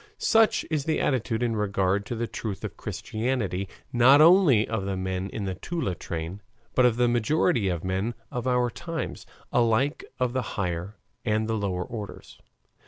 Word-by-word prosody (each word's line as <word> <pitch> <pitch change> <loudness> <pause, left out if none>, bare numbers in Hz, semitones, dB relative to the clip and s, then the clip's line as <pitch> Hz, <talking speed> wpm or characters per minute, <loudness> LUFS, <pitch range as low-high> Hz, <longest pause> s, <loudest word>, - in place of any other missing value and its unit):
Such 225 -1 +3
is 150 -3 0
the 160 - +1
attitude 120 -3 0
in 115 -2 0
regard 100 -1 0
to 120 - -3
the 115 +1 -1
truth 110 -3 -5
of - - -5
Christianity 110 -5 -3 0.2
not 125 +4 +7
only 155 - +6
of 110 -3 -2
the 95 -1 -2
men 95 +1 -3
in 100 - -4
the 95 - -2
Toula 130 - -3
train, 85 +3 -5 0.3
but 125 -1 +5
of 120 -1 0
the 120 0 +3
majority 120 - +2
of 85 -3 -2
men 95 +5 -1 0.2
of 125 0 -3
our 125 -1 +2
times, 165 +5 -5 0.3
alike 120 +5 +2 0.2
of 125 -1 0
the 130 - 0 0.2
higher 90 +1 -2 0.3
and 110 -1 0
the 115 - -1
lower 100 -4 -1
orders. 105 +1 -8
110 Hz, 170 wpm, -26 LUFS, 95-125 Hz, 0.3 s, not